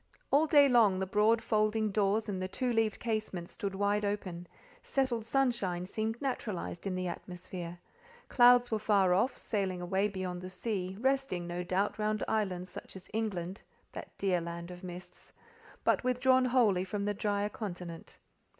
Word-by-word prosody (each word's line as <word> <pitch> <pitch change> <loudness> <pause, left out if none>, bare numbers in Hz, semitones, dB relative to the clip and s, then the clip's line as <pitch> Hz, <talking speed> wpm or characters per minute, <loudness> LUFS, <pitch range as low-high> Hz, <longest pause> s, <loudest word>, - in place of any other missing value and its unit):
All 295 +3 +4
day 290 -2 +7
long 225 -7 +5
the 190 - -1
broad 210 +4 +3
folding 215 0 +1
doors 210 +2 +1
and 190 -3 -3
the 185 - -1
two 245 +5 -1
leaved 225 -2 +1
casements 215 -6 -3
stood 195 -1 -4
wide 205 +1 +1
open: 185 -4 -3 0.3
settled 260 -4 0
sunshine 230 -9 0
seemed 220 +4 -3
naturalized 210 -9 -3
in 185 - -2
the 185 0 -2
atmosphere; 175 0 -7 0.5
clouds 245 -1 +6
were 220 - +1
far 200 -4 +3
off, 240 +8 +1
sailing 195 -4 -2
away 190 +3 +1
beyond 185 -2 -5
sea, 190 -1 -3
resting, 265 -8 0
no 175 +1 -3
doubt, 195 +4 -1
round 215 0 0
islands 190 -5 -1
such - - -9
as 185 - -11
England—that 195 -4 -5
dear 185 -3 +1
land 170 +1 -6
of 180 0 -10
mists—but 180 +5 -5
withdrawn 255 +1 +3
wholly 230 -8 +3
from 200 +2 -3
the 205 - 0
drier 205 0 -1
continent. 180 -6 -7
205 Hz, 155 wpm, -32 LUFS, 185-225 Hz, 0.5 s, day